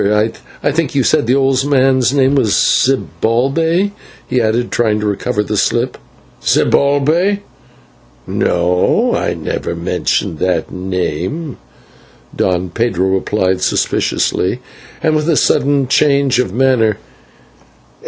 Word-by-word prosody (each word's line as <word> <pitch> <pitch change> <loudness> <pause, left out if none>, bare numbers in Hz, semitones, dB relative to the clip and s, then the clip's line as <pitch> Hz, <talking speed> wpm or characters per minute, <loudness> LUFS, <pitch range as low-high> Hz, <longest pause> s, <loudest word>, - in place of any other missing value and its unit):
I 105 +2 +1
think - - -19 0.2
that - - -1
you - - +2
said - - +1
the 125 - +3
old 135 -1 +2
man's 130 -3 +2
name 135 -1 +2
was 125 -7 +2
Zibalbay," 135 - +1 0.4
he 125 - 0
added, 115 +2 0
trying 110 -3 +1
to 105 - -3
recover 105 +2 -1
the - - -3
slip. - - 0 0.5
"Zibalbay! 155 +9 +2 0.8
No, 90 +1 +1
I - - -1
never - - -4
mentioned 80 - -2
that 90 -3 -1
name," 95 - -4 0.8
Don 90 -1 -1
Pedro 95 -3 0
replied 95 -1 0
suspiciously, - - 0 0.4
and 155 -1 +2
with 155 +2 0
a 160 - +2
sudden 140 -1 +2
change 140 -2 +2
of 125 -7 0
manner. 120 -3 +2
125 Hz, 120 wpm, -15 LUFS, 100-140 Hz, 0.8 s, the